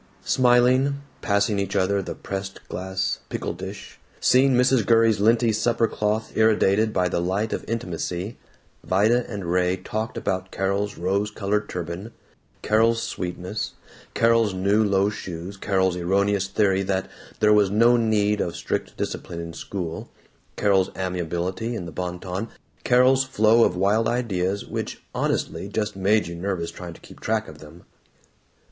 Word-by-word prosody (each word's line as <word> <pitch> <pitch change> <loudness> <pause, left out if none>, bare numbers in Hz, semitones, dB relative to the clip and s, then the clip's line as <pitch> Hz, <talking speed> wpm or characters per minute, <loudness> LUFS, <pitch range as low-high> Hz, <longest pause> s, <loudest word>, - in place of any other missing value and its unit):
Smiling, 130 +3 +3 0.2
passing 100 0 +1
each 100 0 -2
other 100 +1 +2
the - - -6
pressed 95 0 -6
glass 95 +1 -2
pickle - - -3
dish, 95 +3 -9 0.2
seeing 130 +1 +4
Mrs. 125 -1 +4
Gurrey's 115 -1 +4
linty 115 +2 +4
supper 115 +1 +1
cloth 105 +1 -2
irradiated 110 -1 +3
by 90 -3 +1
the 85 - -1
light 100 +5 -1
of - - -3
intimacy, 95 -2 -4 0.4
Vida 110 +6 +2
and 100 -5 -5
Raymie 90 +1 0
talked 110 +1 -3
about 95 -1 -2
Carol's 100 +2 -1
rose 100 +4 0
colored 105 0 -2
turban, 90 +5 -5 0.5
Carol's 115 +2 +3
sweetness, 90 +2 -4 0.4
Carol's 115 -3 +3
new 100 +4 +2
low 100 0 +2
shoes, 95 -2 -7
Carol's 95 -2 +1
erroneous 100 +2 +1
theory 95 -1 +2
that 95 0 -1 0.3
there 105 0 +5
was 105 -2 +4
no 115 +4 +5
need 105 -3 +2
of 85 - -2
strict 85 - -3
discipline 85 - -4
in 85 0 -6
school, 85 -2 -5 0.5
Carol's 95 -2 +2
amiability 90 +4 -2
in 90 - -5
the 85 - -7
Bon 90 +2 -4
Ton, 95 +4 -4 0.4
Carol's 130 +2 +4
flow 115 -3 +4
of 90 - +2
wild 100 +5 +2
ideas, 100 -5 -1
which, - - -5
honestly, 100 - -2
just 105 0 -2
simply 95 +1 0
made 110 0 +4
you 85 - -6
nervous 85 -1 -3
trying 90 -2 -8
to - - -16
keep - - -14
track 110 0 -1
of 75 -1 -11
them. 80 +3 -14
100 Hz, 155 wpm, -24 LUFS, 95-110 Hz, 0.5 s, there